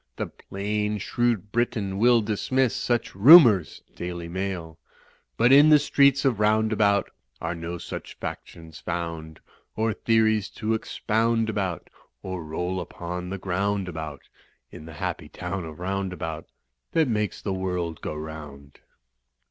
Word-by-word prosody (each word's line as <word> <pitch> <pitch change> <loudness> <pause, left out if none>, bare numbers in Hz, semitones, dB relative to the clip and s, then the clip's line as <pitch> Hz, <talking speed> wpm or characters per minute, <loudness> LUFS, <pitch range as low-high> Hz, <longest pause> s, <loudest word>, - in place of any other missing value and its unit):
The - - -3
plain, 105 +2 -3
shrewd 110 -1 -1
Briton 105 -5 -1
will 120 +1 +5
dismiss 115 +4 0
Such 120 -1 -1
nmiours 110 - +7
(Daily 85 -1 -5
Mail). 85 -3 -5 0.6
But 120 +2 +4
in 145 +3 +8
the 155 - +8
streets 140 -1 +3
of 125 -6 +2
Roundabout 105 -1 +2 0.3
Are 85 +1 -3
no 85 +1 -5
such - - -8
factions 80 -1 -8
found. 80 -2 -5 0.3
Or 110 0 0
theories 110 -2 +2
to 110 0 -1
expound 115 0 0
about 95 -6 -3 0.3
Or 95 -3 -5
roll 90 +4 -3
upon 90 +1 -6
the 95 - -4
ground 95 +1 -1
about. 80 -4 -6 0.5
In 80 - -11
the 80 - -9
happy 75 - -4
town 95 -3 -5
of 80 +1 -10
Roundabout 90 -4 -4 0.5
That 160 -3 +3
makes 105 -5 -1
the 100 - -3
world 90 -4 -3
go - - -4
round." 75 -2 -9
95 Hz, 135 wpm, -25 LUFS, 85-110 Hz, 0.6 s, in